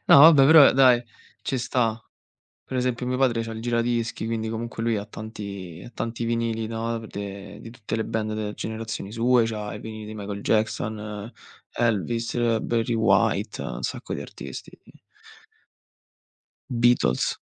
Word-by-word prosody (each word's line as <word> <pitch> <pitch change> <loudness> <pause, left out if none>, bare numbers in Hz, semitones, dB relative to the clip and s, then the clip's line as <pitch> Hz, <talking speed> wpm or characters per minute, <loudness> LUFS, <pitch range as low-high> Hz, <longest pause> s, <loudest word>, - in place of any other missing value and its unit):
No - - +9
vabbè 150 -3 +9
però 155 -2 +9
dai 125 -2 +5 0.4
ci 130 - -1
sta. 115 -2 0 0.6
Per 130 - -5
esempio 125 0 -1
mio 125 - 0
padre 120 -3 +2
c'ha 115 0 -6
il 110 - -6
giradischi 115 -1 -1
quindi 110 -1 -2
comunque 115 0 -4
lui 115 -1 +1
ha 100 - -3
tanti 100 -6 -8
ha - - -10
tanti 115 0 -3
vinili, 115 -1 -1
no, 115 +1 -2
v 110 - -9
de 100 -1 -7
di 115 - -10
tutte 115 -3 -6
le 110 - -1
band 110 -1 -2
delle 105 -1 -3
generazioni 110 -2 -5
sue, 120 +1 +3
c'ha 105 -2 -4
i - - -6
vinili 110 -1 -8
di 110 - -7
Michael 100 -1 -5
Jackson, 110 0 -1 0.4
Elvis, 115 +1 0
Barry 115 0 0
White, 110 -4 +2
ha - - -5
un 65 - -7
sacco - - -4
di - - -5
artisti. 70 -2 -8 2.0
Beatles. 120 - +2
115 Hz, 160 wpm, -25 LUFS, 110-120 Hz, 2.0 s, No